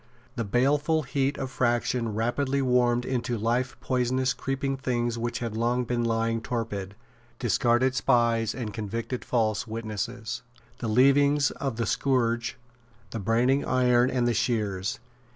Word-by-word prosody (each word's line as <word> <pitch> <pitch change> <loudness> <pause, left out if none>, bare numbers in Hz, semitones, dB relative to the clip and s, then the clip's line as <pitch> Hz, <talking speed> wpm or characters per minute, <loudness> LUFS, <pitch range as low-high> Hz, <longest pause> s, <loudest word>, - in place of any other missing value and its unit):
The 115 - -1
baleful 145 +8 +2
heat 140 +1 -1
of 130 -1 -4
faction 120 -2 0
rapidly 130 +5 0
warmed 125 -2 +2
into 120 -2 -1
life 120 +3 -1
poisonous 130 0 +1
creeping 135 0 -2
things 120 -3 -1
which 120 0 -2
had 115 -3 -4
long 120 +2 +1
been 120 0 -1
lying 115 0 0
torpid, 105 -5 -4 0.4
discarded 120 +3 +2
spies 115 -4 +2
and 115 -5 -4
convicted 115 +4 -4
false 110 -1 0
witnesses, 110 +1 -4 0.4
the 115 - -3
leavings 140 +4 +4
of 135 -4 -3
the 115 0 -1
scourge, 120 -1 0 0.5
the 115 - -4
branding 120 +7 +2
iron 125 -1 +3
and 125 -2 +1
the 120 - +2
shears. 105 -5 -1
120 Hz, 135 wpm, -27 LUFS, 115-130 Hz, 0.5 s, leavings